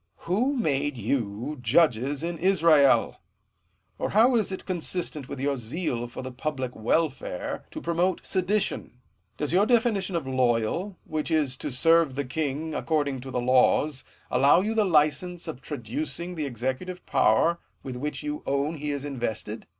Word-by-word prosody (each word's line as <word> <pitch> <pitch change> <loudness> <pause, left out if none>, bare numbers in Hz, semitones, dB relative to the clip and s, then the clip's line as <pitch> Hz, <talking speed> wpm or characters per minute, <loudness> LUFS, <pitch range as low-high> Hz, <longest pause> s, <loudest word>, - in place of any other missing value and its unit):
>A'ho 235 +11 +1
made 145 - 0
you 115 +4 -2
judges 135 +2 +2
in 170 -1 -3
Israel? 165 -6 +4 0.8
Or - - -1
how 235 +5 +5
is 215 -4 +1
it 190 - -5
consistent 175 -5 -2
with 140 - -6
your 140 0 0
zeal 120 0 -3
for 120 +2 -8
the 130 - -6
public 130 -1 -4
welfare, 130 - -1
to - - -7
promote 170 +2 0
sedition? 190 -7 -1 0.4
Does 150 +1 -2
your 200 +4 +4
definition 220 -6 +2
of 165 -5 -1
loyal, 130 - 0
which 155 0 -3
is 150 -5 +1
to - - -4
serve 165 +1 +3
the 145 0 -2
king 155 +3 -3
according 145 -5 -1
to 135 - -8
the 125 - -2
laws, 130 +3 +3 0.3
allow 140 +7 +5
you 215 +3 -1
the 220 -2 +2
licence 170 +1 +1
of 125 - -6
traducing 150 +7 -4
the 155 -4 -3
executive 130 +9 -4
power 165 +11 +3 0.2
with 130 -2 -6
which 150 - -4
you 300 0 -4
own 140 +4 0
he 150 0 -4
is 140 -1 -3
invested 115 -5 -4
150 Hz, 160 wpm, -26 LUFS, 130-175 Hz, 0.8 s, how